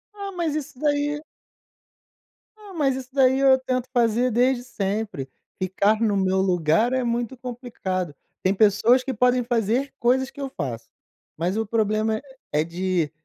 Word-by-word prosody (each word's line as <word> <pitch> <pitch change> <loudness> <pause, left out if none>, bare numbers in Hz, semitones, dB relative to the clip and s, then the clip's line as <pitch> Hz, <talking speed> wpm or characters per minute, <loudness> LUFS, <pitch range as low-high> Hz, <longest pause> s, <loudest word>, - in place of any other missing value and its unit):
Ah, 400 -1 -5
mas 325 -4 -1
isso 295 -3 -5
daí 290 0 0 1.4
ah, 415 -2 -13
mas 280 -6 +1
isso 260 -1 -7
daí 265 -1 +4
eu 270 -1 +6
tento 255 -1 -2
fazer 240 0 +2
desde 245 +2 +2
sempre. 200 - -3 0.3
Ficar 200 +4 +2
no 210 -3 +2
meu 190 0 +2
lugar 180 +5 +2
é 260 -1 +1
muito 240 +1 -2
complicado. 230 - -4 0.3
Tem 190 - +3
pessoas 220 +5 +4
que 265 - -3
podem 250 +2 +3
fazer 240 +3 0
coisas 260 +2 +2
que 285 - -10
eu 270 - -3
faço, 120 -7 -5 0.5
mas 175 +5 -1
o 225 - 0
problema 215 +1 0 0.3
é 150 +1 +2
de 170 -2 -1
235 Hz, 155 wpm, -24 LUFS, 195-260 Hz, 1.4 s, eu